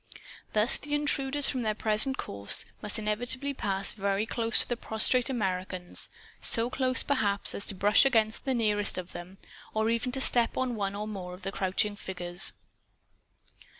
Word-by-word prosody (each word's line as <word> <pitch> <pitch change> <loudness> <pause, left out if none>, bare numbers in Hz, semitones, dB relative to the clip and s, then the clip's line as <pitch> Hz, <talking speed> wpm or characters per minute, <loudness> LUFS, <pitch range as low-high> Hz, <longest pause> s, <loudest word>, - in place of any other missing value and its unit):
Thus 215 +3 +5
the 295 0 -2
intruders, 290 -1 +2
from 255 - -1
their 215 -2 -1
present 220 +6 0
course, 100 0 -2 0.2
must 210 - +3
inevitably 245 +6 -1
pass 195 -6 -2
very 200 0 -1
close 230 0 +2
to - - +2
the 240 - -1
prostrate 235 +3 0
Americans 185 -6 -1 0.3
so 235 +2 +1
close, 255 -1 +1
perhaps, 205 -8 +1
as 200 - -2
to 195 - +2
brush 205 +6 +4
against 225 -4 +1
the 265 -1 0
nearest 210 -4 +2
of 185 0 -6
them, 180 +2 -10 0.4
or 220 +1 +1
even 230 +2 -1
to 265 - +2
step 240 -3 +3
on 255 -1 -1
one 200 -2 -3
or 210 +1 -4
more 185 -4 -6
of 180 - -17
the 195 - -3
crouching 195 +2 -1
figures. 175 -2 -2
215 Hz, 170 wpm, -28 LUFS, 195-250 Hz, 0.4 s, Thus